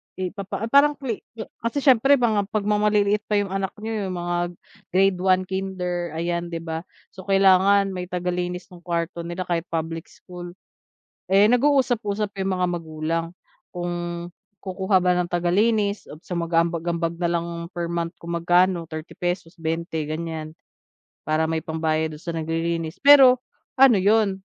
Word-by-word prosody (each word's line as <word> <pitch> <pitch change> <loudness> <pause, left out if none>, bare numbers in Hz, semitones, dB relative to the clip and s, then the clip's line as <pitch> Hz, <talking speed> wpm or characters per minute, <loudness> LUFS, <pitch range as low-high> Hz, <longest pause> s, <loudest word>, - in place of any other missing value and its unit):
ipapa 195 +3 -4
ah, - - -6
parang 290 +1 +5
cle 245 -7 -4 0.2
ah, 220 - -6 0.2
kasi 280 +4 -2
siyempre 270 +1 +6
pang, 230 -5 +2
ah, 200 - -2
'pag 210 0 -2
maliliit 210 0 +2
pa 210 - 0
'yong 200 -2 0
anak 195 -1 -2
niyo, 220 -3 -2
'yong 185 - -4
mga 175 0 -2 0.5
grade 190 0 +2
1, 185 0 +3
kinder, 180 -3 -3
ayan 170 +1 -2
'di 165 -1 -5
ba? 160 +1 -5 0.2
So 190 0 -12
kailangan 195 0 +4
may 180 -1 -5
taga-linis 180 +1 -3
ng 175 - -12
kuwarto 170 0 -2
nila 175 +2 -4
kahit 170 -1 -2
public 165 0 -4
school. 175 -1 -11 0.8
Eh, 200 +2 +6
nag-uusap-usap 235 -6 +1
'yong 190 - -1
mga 180 - +2
magulang, 165 -1 -2 0.5
kung 175 -1 -4 0.4
kukuha 190 0 -1
ba 180 - +4
ng 180 -1 +1
taga-linis 200 +4 +1
o - - -9 0.2
mag-a-ambag-ambag 170 0 0
na 175 - +1
lang 170 0 -1 0.3
per 170 -1 -3
month 170 0 -3
kung 170 0 -8
magkano, 175 0 +2
₱30, 155 0 -7 0.5
20 160 -1 -3
ganyan, 155 0 -5 0.7
para 160 +1 +1
may 160 - 0
pambayad 160 -1 -1
do'n 150 - -12
sa 170 - -4
naglilinis 165 +1 -3
pero, 265 -3 +8 0.3
ano 255 -5 +6
'yon, 200 0 +3
180 Hz, 155 wpm, -23 LUFS, 170-200 Hz, 0.8 s, pero